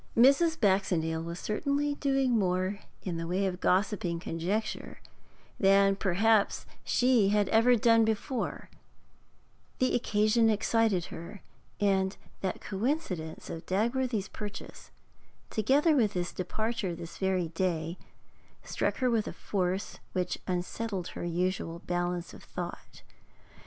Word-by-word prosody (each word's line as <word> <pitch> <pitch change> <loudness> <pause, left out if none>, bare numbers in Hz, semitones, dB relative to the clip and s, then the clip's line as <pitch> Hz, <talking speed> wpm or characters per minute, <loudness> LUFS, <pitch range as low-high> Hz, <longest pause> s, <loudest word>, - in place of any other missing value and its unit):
Mrs. 280 +7 +5
Baxendale 180 -6 +1
was 170 +1 -5
certainly 285 +6 0
doing 270 -2 +1
more 190 -2 +1 0.2
in 175 -3 -3
the 165 0 -4
way 185 +3 0
of 185 -1 -2
gossiping 185 -3 +1
conjecture 180 +7 -3 0.6
than 195 0 +5
perhaps 200 +3 +2 0.2
she 245 -5 +3
had 205 0 +2
ever 235 +3 +5
done 230 0 +5
before; 220 +3 -2 1.1
the 255 - +1
occasion 220 0 +3
excited 215 -3 +2
her, 170 +4 -9 0.4
and 190 -1 +1 0.2
that 190 - -3
coincidence 195 - -3
of 165 - -7
Dagworthy's 225 +1 0
purchase, 210 +1 -8 0.6
together 280 - +3
with 220 -6 +3
his 175 -1 -2
departure 200 0 -2
this 170 0 -9
very 185 -3 0
day, 165 0 -2 0.6
struck - - -1
her 255 - +2
with 225 -2 +1
a - - -4
force 190 -1 -2
which 180 -1 -1
unsettled 185 +1 -3
her - - -6
usual 175 -1 -1
balance 175 0 -2
of - - -12
thought. - - -7
200 Hz, 120 wpm, -30 LUFS, 180-225 Hz, 1.1 s, Mrs